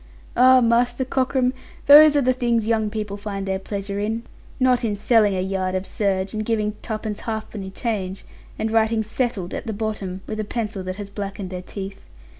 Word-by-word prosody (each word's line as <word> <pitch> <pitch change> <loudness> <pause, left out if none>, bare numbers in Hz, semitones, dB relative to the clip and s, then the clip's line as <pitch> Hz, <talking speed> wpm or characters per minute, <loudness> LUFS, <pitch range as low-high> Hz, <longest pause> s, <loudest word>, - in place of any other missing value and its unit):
Ah, 255 +1 +7
Master 240 +2 +2
Cockram, 260 -1 +1 0.3
those 300 +1 +9
are 285 - +3
the 255 +1 +3
things 235 -3 +1
young 220 -1 +1
people 210 -2 -4
find 200 -1 -5
their 190 0 -1
pleasure 200 0 -4
in, 220 +3 -2 0.4
not 255 -2 +3
in 215 -3 0
selling 210 -1 +3
a 185 - 0
yard 190 0 -1
of 185 +1 -2
serge, 195 -2 -1
and 215 0 -2
giving 215 -1 0
twopence 215 -1 -4
halfpenny 220 -3 -5
change, 195 -2 -3 0.3
and 220 - -1
writing 225 0 +2
"settled" 220 -5 -2
at - - -5
the 220 - -2
bottom, 200 -3 -4
with 215 0 -5
a - - 0
pencil 210 -2 -3
that 185 0 -4
has 200 0 -8
blacked 200 -1 -5
their 180 -1 -5
teeth. 195 +1 -8
215 Hz, 190 wpm, -23 LUFS, 195-235 Hz, 0.4 s, those